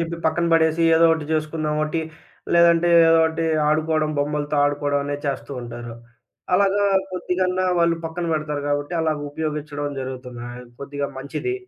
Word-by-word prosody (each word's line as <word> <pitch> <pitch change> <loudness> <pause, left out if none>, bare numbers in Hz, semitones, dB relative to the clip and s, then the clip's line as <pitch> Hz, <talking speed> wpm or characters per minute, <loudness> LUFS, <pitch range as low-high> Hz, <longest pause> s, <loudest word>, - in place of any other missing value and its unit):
జెప్పి 170 0 -3
పక్కన 170 +2 +1
బడేసి 160 0 +3
ఏదోటి 165 -1 +4
చేసుకున్నాం 155 -1 -1
ఓటి. 160 +2 -2 0.5
లేదంటే 170 0 +5 0.2
ఏదోటి 160 0 +3 0.2
ఆడుకోవడం, 155 0 +1
బొమ్మలతో 145 0 -1
ఆడుకోవడం 145 0 0
అనేది 145 0 -4
చేస్తూ 140 0 -3
ఉంటారు. 120 0 -8 0.6
అలాగా 200 +1 +3 0.3
కొద్దిగన్నా 185 +1 -1
వాళ్ళు 170 0 +3
పక్కన 165 +2 -4
బెడతారు 150 -2 -2
గాబట్టి, 145 +3 -2
అలాగా 155 -2 0
ఉపయోగించడం 150 -1 -4
జరుగుతుంది. 125 -2 -7
ఆహ్, 125 +1 -9 0.2
కొద్దిగా 140 0 -4
మంచిది. 375 - -3
155 Hz, 135 wpm, -22 LUFS, 145-165 Hz, 0.6 s, లేదంటే